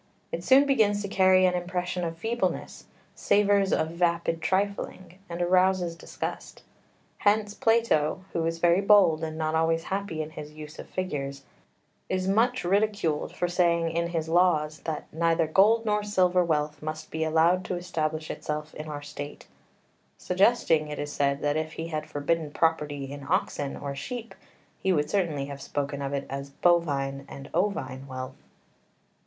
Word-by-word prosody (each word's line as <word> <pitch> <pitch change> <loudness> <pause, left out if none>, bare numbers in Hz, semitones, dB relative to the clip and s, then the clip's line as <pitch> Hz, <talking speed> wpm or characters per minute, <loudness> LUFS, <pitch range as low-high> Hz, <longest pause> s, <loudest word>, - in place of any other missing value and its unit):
It - - -4
soon 270 +2 +6
begins 210 -7 +2
to - - -3
carry 185 -1 +4
an 180 - +3
impression 180 0 -2
of 165 -1 -3
feebleness, 230 +7 -2 0.3
savours 200 -1 +3
of 160 - +1
vapid 170 -1 0
trifling, 190 -1 -2
and 170 +1 -2
arouses 180 -1 +2
disgust. 165 - -6 0.6
Hence 210 0 +2
Plato, 210 -8 +2
who 165 - 0
is 165 0 -2
very 175 +2 +3
bold 195 -6 +5
and 155 0 -4
not 155 0 -1
always 165 0 +2
happy 195 -6 -2
in 155 - -9
his 150 -1 -9
use 155 0 -10
of - - -9
figures, 140 -7 -4 0.7
is 185 0 -1
much 230 +6 +2
ridiculed 195 -5 0
for 175 - 0
saying 170 -2 +2
in 170 +1 0
his 165 -2 -2
Laws 160 -3 +2
that 155 -2 -3
"neither 165 0 +2
gold 210 +8 +4
nor 210 -1 +1
silver 185 -3 +2
wealth 150 -2 -1
must 155 0 -6
be 160 0 -1
allowed 165 +3 +3
to 180 - -2
establish 160 -3 -3
itself 150 +1 -5
in 155 +1 -7
our 145 -1 -6
State," 145 0 -8 0.7
suggesting, 180 -5 +2
it 150 -1 -5
is 145 0 -4
said, 140 0 0
that 145 +1 +1
if 155 0 -3
he 165 +1 -5
had 155 -2 -4
forbidden 155 +2 -1
property 145 -3 0
in 140 0 -7
oxen 140 -1 -1
or 140 -1 -5
sheep 230 - -6 0.5
he 190 - +1
would 150 -4 +1
certainly 165 -9 0
have 140 0 -8
spoken 140 0 -3
of 140 0 -3
it 140 -1 -2
as 140 +1 -5
"bovine 140 -4 +1
and 140 +1 -10
ovine 160 -8 -1
wealth." 130 0 -7
165 Hz, 165 wpm, -27 LUFS, 150-185 Hz, 0.7 s, soon